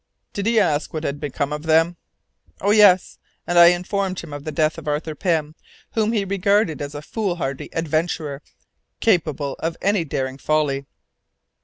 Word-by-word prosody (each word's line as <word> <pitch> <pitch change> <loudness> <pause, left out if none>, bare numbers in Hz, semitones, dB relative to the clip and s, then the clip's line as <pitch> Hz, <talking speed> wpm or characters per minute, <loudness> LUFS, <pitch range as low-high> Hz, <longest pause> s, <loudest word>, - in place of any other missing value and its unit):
"Did 200 +1 -2
he 230 -1 +4
ask 155 -6 0
what 155 - -3
had 145 -1 -3
become 145 0 -3
of 150 - -4
them?" 165 +2 +3 0.6
"Oh 200 - +1
yes, 205 -4 +5 0.3
and 175 0 +3
I 170 - +10
informed 185 +2 0
him 165 -4 -8
of 145 0 -7
the 155 - -3
death 155 0 0
of 155 - -12
Arthur 150 +2 -2
Pym, 155 -1 -1 0.4
whom 220 -1 +1
he 210 -4 0
regarded 200 -3 +1
as 145 +1 -5
a 145 - -6
foolhardy 175 - -3
adventurer, 155 -2 -2 0.6
capable 155 - +1
of 165 0 -3
any 200 -3 +1
daring 135 -3 -3
folly." 140 -3 0
160 Hz, 165 wpm, -22 LUFS, 150-190 Hz, 0.6 s, I